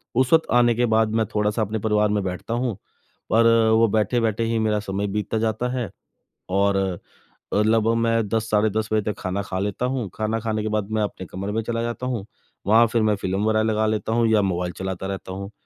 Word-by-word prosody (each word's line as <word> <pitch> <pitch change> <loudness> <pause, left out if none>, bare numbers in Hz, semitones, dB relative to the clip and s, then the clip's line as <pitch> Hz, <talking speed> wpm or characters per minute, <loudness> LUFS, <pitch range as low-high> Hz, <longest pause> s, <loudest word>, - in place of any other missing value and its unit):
उस 130 +3 +2
वक्त 160 0 +4
आने 120 -1 +4
के 120 +2 +2
बाद 110 0 +3
मैं 110 -1 +2
थोड़ा-सा 105 +1 +1
अपने 110 +1 -1
परिवार 105 0 +2
में 105 -1 0
बैठता 95 +4 -4
हूँ। 120 -4 -1 0.5
और 115 +1 +5 0.3
वो 115 0 +5
बैठे-बैठे 110 +1 +1
ही 115 0 0
मेरा 110 -1 +1
समय 100 0 -3
बीतता 105 +1 -2
जाता 110 +2 -1
है। 120 -6 -2 0.6
और 100 +1 +2 0.8
अ, - - +1
लगभग 110 +1 +2
मैं 115 -1 +1
10 110 +1 -1
साढ़े 105 0 +3
10 110 +1 -2
बजे 110 - +3
तक - - -11
खाना 95 +1 -2
खा 95 - -5
लेता 105 +5 -2
हूँ। 125 -5 -2
खाना 110 +1 -1
खाने 110 -1 -2
के - - -2
बाद 105 -1 -2
मैं 110 0 0
अपने 100 -2 -5
कमरे 100 +2 -4
में 110 - 0
चला 115 +1 -2
जाता 120 +1 -4
हूँ। 120 -6 -3 0.4
वहाँ 115 +3 +6
फ़िर 115 +1 0
मैं 105 -1 +3
फ़िल्म 95 0 -2
वग़ैरह 110 0 +2
लगा 110 0 +1
लेता 110 0 -1
हूँ 115 0 +3
या 110 -1 +4
मोबाइल 90 -2 -1
चलाता 95 0 -4
रहता 95 -1 -6
हूँ। 100 +1 -6
110 Hz, 220 wpm, -23 LUFS, 100-115 Hz, 0.8 s, वहाँ